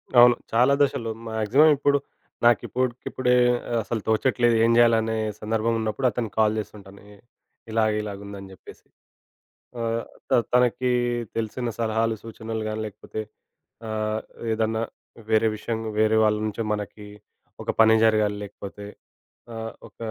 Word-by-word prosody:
అవును. 120 0 +8 0.2
చాలా 125 +4 +5
దశలు. 120 -5 +1 0.2
మాక్సిమం 110 +8 +4
ఇప్పుడు 145 0 +3 0.5
నాకు 120 -2 +5
ఇప్పటికిప్పుడే 125 0 -1 0.4
ఆహ్, 120 - +1
అసలు 115 0 -3
తోచట్లేదు, 120 +1 +2
ఏం 115 - +4
జేయాలనే 115 -1 +4 0.2
సందర్భం 110 +1 0
ఉన్నప్పుడు 110 +4 0
అతనికి 115 -1 -4
కాల్ 110 0 +3
జేస్తుంటాను. 100 -2 -10
ఎ - - -17 0.5
ఇలాగ, 110 -1 +2
ఇలాగుందని 100 -1 -8
జెప్పేసి. 95 - -15 0.9
ఆహ్, 115 0 -1 0.3
త - - -20 0.2
తనకి 125 0 +3 0.5
తెలిసిన 115 +2 -2
సలహాలు, 115 0 +1
సూచనలు 110 0 -5
గాని 110 0 -3
లేకపోతే 105 +1 -7 0.7
ఆహ్, 110 0 -2 0.3
ఏదన్నా 110 0 0 0.5
వేరే 110 0 +4
విషయం 110 +1 -3 0.2
వేరే 110 0 +4
వాళ్ళ 105 0 +3
నుంచే 110 +2 -3
మనకి 105 0 -6 0.6
ఒక - - -7
పని 110 0 +6
జరగాలి, 105 -2 +2
లేకపోతే 100 0 -9 0.7
ఆహ్, 115 0 -5 0.2
ఒక - - -43
110 Hz, 130 wpm, -24 LUFS, 110-115 Hz, 0.9 s, అవును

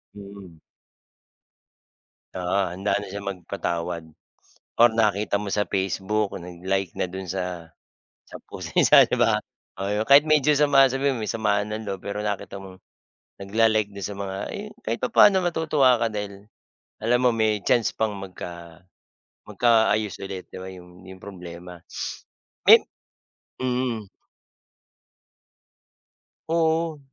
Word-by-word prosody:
Mm. 100 -5 -12 1.7
Oo, 90 +2 -1
handa 95 +3 0
na 105 - -5
siya 100 +1 -7
magpatawad 85 -3 -4 0.7
or 120 - +9
nakita 105 -2 +1
mo 100 -1 -4
sa 105 0 0
Facebook, 100 +2 -1
nag-like 90 +2 -3
na - - 0
do'n 95 0 -7
sa 90 -2 -4 0.6
sa - - -10
post - - -8
niya - - +4
sa - - +9
'di - - -1
ba? - - +3 0.4
Oo, 100 +1 -2
yung 105 +1 -1
kahit 145 +3 +8
medyo 150 -1 +3
sama 140 -3 +5
sabihin 135 +1 0
mo 115 - -5
may 105 - -2
samaan 105 -1 0
ng 110 0 -5
loob. 95 -2 -5
Pero 100 +1 -5
nakita 105 -1 -4
mong 95 -1 -12 0.6
nagla-like 110 +1 +2
do'n 100 - -5
sa 105 - -4
mga, 100 -1 -5 0.2
eh - - -5
yun, - - -16
kahit 115 +2 -2
papaano 190 +9 +5
matutuwa 155 -7 +2
ka - - +2
dahil 100 -1 -6 0.5
alam 120 +3 +1
mo 125 - +4
may 110 -2 +1
chance 115 +2 +2
pang 110 -1 -1
magka 85 -3 -9 0.7
magkaayos 110 -4 +2
ulit, 95 -1 -6
'di - - -10
ba, 95 - -7
'yong, 90 0 -14
'yong 95 - -13
problema. 90 -2 -10 0.8
Mem - - +9 0.8
mm. 125 -4 -1 2.4
Oo. 165 -1 +1
100 Hz, 135 wpm, -24 LUFS, 95-115 Hz, 2.4 s, or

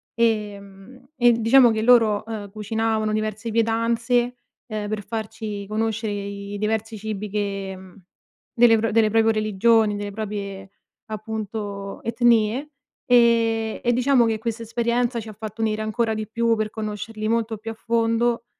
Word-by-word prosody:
Ehm, 210 +2 -3
e 240 -3 +5
diciamo 235 +2 +5
che 220 0 -1
loro, 225 -4 +5
uhm, 215 -3 -6
cucinavano 220 0 -1
diverse 215 +1 -2
pietanze, 230 +2 +1 0.3
ehm, 215 -3 -4
per 215 -1 -3
farci 210 -1 -5
conoscere 220 0 -1
i 200 0 -5
diversi 220 +1 -2
cibi 210 0 -5
che 195 -1 -3
mhmm, 185 0 -15 0.5
del 225 -2 +5
delle 220 -1 +4
proprie 225 +1 +3
religioni, 215 0 +2
delle 205 0 -4
proprie 200 -2 -5 0.4
appunto 210 -2 -5
etnie, 235 +3 +2 0.4
ehm, 230 -2 +3
e 240 - +3
diciamo 250 0 +3
che 225 -1 0
questa 230 +1 -4
esperienza 235 +1 0
ci 225 - -8
ha - - -8
fatto 215 +1 -7
unire 215 -1 0
ancora 220 +1 0
di 215 0 -4
più, 230 +1 +1
per 215 -1 -2
conoscerli 215 0 -5
molto 225 0 0
più 225 +2 -6
a - - -6
fondo, 230 +1 0
220 Hz, 145 wpm, -23 LUFS, 210-230 Hz, 0.5 s, e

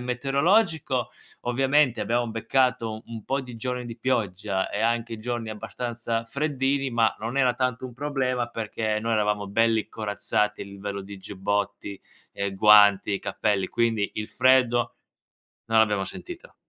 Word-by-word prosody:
metereologico, 135 - +1 0.4
ovviamente 135 0 +2
abbiamo 120 0 0
beccato 115 +1 +1
u 110 +1 -7
un 115 -2 -8
po' 135 +1 -1
di 125 -3 -9
giorni 125 0 -3
di 115 0 -7
pioggia 100 -5 -1
e 105 - -3
anche 115 0 0
giorni 120 0 -3
abbastanza 115 +2 -4
freddini, 135 0 0
ma 115 -2 +2
non 115 +5 -3
era 125 -2 +3
tanto 125 0 -1
un 125 - -11
problema 130 -4 -1
perché 110 -1 -2
noi 115 +1 -1
eravamo 105 -1 +1
belli 110 +1 +2
corazzati 105 -1 -1
a - - -4
livello 100 0 -6
di 100 +1 -9
giubbotti, 100 +1 -3 0.3
ehm, 100 -1 -3
guanti, 105 -1 +6
cappelli, 100 -3 -1
quindi 115 -3 0
il 105 +1 -4
freddo 125 0 +3 0.7
non 115 0 +3
l'abbiamo 105 -3 +3
sentito. 350 - -9
115 Hz, 145 wpm, -25 LUFS, 105-125 Hz, 0.7 s, guanti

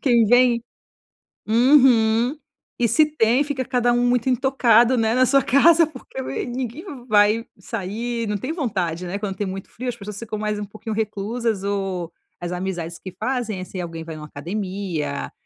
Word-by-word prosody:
quem 240 -4 +4
vem 245 0 +4 0.9
Uhum. 240 0 +4 0.4
E, 235 - +2
se 305 +8 +4
tem, 255 -3 +2
fica 275 -3 -3
cada 245 -1 +1
um 240 0 +2
muito 245 +1 +1
intocado, 255 -2 +4
né, 225 0 +1
na 255 - +4
sua 275 +2 +4
casa, 325 +5 +5
porque 260 - -9 0.3
ninguém 250 - -5 0.2
vai 215 +1 +3
sair, 230 +3 -4
não 210 - -1
tem 205 - -4
vontade, 185 - -2
né? 180 - -3
Quando 200 -2 -4
tem 205 - -2
muito 190 0 -6
frio, 250 +2 -6
as 245 - -1
pessoas 205 -2 -8
ficam 220 -2 -5
mais 210 -1 -2
um 210 - -3
pouquinho 215 +2 -7
reclusas, 215 0 -2
ou 195 -4 -3 0.3
as 175 - -4
amizades 175 -2 -4
que 185 - -9
fazem, 240 -7 -2
assim, 185 0 -6
alguém 165 -2 -6
vai 160 -1 -7
numa 150 0 -8
academia, 175 -2 -4
225 Hz, 170 wpm, -22 LUFS, 195-245 Hz, 0.9 s, casa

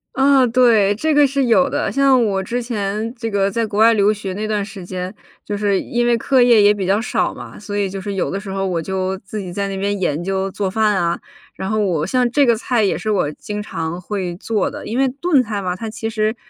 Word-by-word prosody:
啊， 270 0 +4
对， 225 -5 +4
这 310 +8 0
个 290 -1 +5
是 275 0 0
有 260 +4 +4
的。 - - -1
像 270 -3 +4
我 195 -2 0
之 240 +6 -3
前 215 -1 -3
这 230 -2 -4
个 200 -1 +1
在 230 +3 0
国 205 0 -3
外 230 +1 +6
留 205 0 +3
学 200 -3 -4
那 210 +3 -3
段 210 -2 -1
时 200 -2 -9
间， 180 +1 -5 0.3
就 205 - -3
是 200 -2 +1
因 240 0 -1
为 235 -1 +3
课 260 +2 +2
业 240 -2 +6
也 205 +1 +6
比 195 -3 -3
较 200 +2 +2
少 230 - -1
嘛， - - -10
所 205 -1 -5
以 200 -1 +1
就 195 +1 -6
是 200 +1 -4
有 190 - -1
的 195 - -2
时 200 -1 -9
候 195 0 -2
我 175 -3 -1
就 190 +2 -2
自 205 +2 -7
己 185 -3 -6
在 200 +1 -2
那 195 - -4
边 200 +1 -1
研 170 -2 -1
究 195 +1 -1
做 195 0 -2
饭 215 0 +2
啊， 170 -2 0 0.4
然 190 - -4
后 215 +1 0
我 175 -7 0
像 250 +3 +1
这 285 +1 +4
个 235 - +4
菜 235 0 0
也 200 - +1
是 215 - -2
我 180 -7 +1
经 210 +6 -6
常 165 -3 -4
会 185 -2 -4
做 215 +1 -1
的。 - - -8
因 230 - -3
为 270 0 +3
炖 275 +1 +1
菜 210 -2 -4
嘛， 180 -1 -2
它 225 +4 -6
其 220 +1 -4
实， 215 0 -1
210 Hz, 275 characters per minute, -19 LUFS, 195-230 Hz, 0.4 s, 外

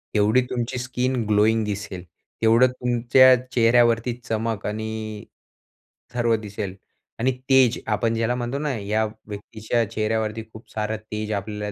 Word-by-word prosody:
तेवढी 105 +4 +4
तुमची 125 +1 -2
skin 125 +1 -1
glowing 110 +1 +3
दिसेल. 100 -3 -5 0.4
तेवढं 115 +3 +5
तुमच्या 125 +1 +5 0.2
चेहऱ्यावरती 120 0 +3
चमक 115 -2 -2
आणि 110 0 -5 0.9
सर्व 120 -2 +2
दिसेल 105 -3 -5 0.4
आणि 130 +3 +2 0.2
तेज 130 -3 +5
आपण 115 -1 +1
ज्याला 115 +2 0
म्हणतो 125 +3 -3
ना, 150 -2 -1
या 105 +2 0 0.2
व्यक्तीच्या 110 +3 -2
चेहऱ्यावरती 110 0 -1
खूप 110 - -13
सारं 110 0 -2
तेज 105 0 -3
आपल्याला 105 +1 -4
110 Hz, 130 wpm, -23 LUFS, 105-120 Hz, 0.9 s, तेवढं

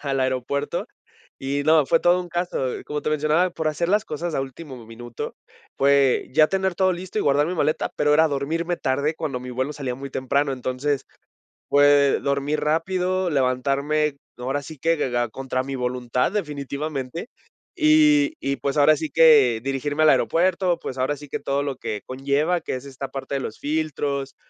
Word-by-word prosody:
al 135 -2 -1
aeropuerto 130 +2 -1 0.6
y 140 +1 -1
no, 155 -2 +4
fue 165 - +4
todo 175 +1 +3
un 175 - -10
caso. 175 +1 -2 0.3
Como 150 0 -4
te - - -2
mencionaba, 155 +4 +2
por 160 -2 -3
hacer 170 +3 -1
las 210 +2 +2
cosas 160 +1 -4
a - - 0
último 135 -2 -9
minuto, 115 +1 -7 0.5
fue 140 -1 +3
ya 155 +2 +5
tener 190 0 -1
todo 185 0 +2
listo 185 +4 -6
y - - +2
guardar 145 +2 +3
mi 180 - -3
maleta, 155 -1 0
pero 150 0 +2
era 160 +2 +5
dormirme 165 +5 -2
tarde 140 +4 0
cuando 145 -6 -3
mi 125 0 -8
vuelo 130 +4 -2
salía 130 -3 -4
muy 135 +1 -8
temprano, 140 +2 0
entonces, 130 +2 -2 0.6
fue 145 -1 +5
dormir 140 +2 -1
rápido, 180 +4 0
levantarme 140 +2 0 0.2
ahora 135 +3 -2
sí 155 +2 -10
que 165 +4 +1
de 135 -4 -1
da 120 -1 0
contra 130 +1 -3
mi 135 +1 -5
voluntad, 125 -1 -1
definitivamente, 150 - -4 0.4
y 310 -2 +4
y 140 0 -1
pues 140 +1 -2
ahora 150 +1 +5
sí 155 +1 -4
que 140 -9 +5
dirigirme 145 +3 -1
al 155 - +6
aeropuerto, 180 +2 +2
pues 130 - -6
ahora 130 +3 0
sí 145 0 -12
que - - -3
todo 140 +1 -1
lo 140 -2 -4
que 105 -5 -4
conlleva, 140 +6 0
que - - -4
es 130 - -6
esta 135 0 -6
parte 135 +1 -5
de - - 0
los 110 -4 -6
filtros, 145 -3 -2
145 Hz, 185 wpm, -23 LUFS, 135-160 Hz, 0.6 s, al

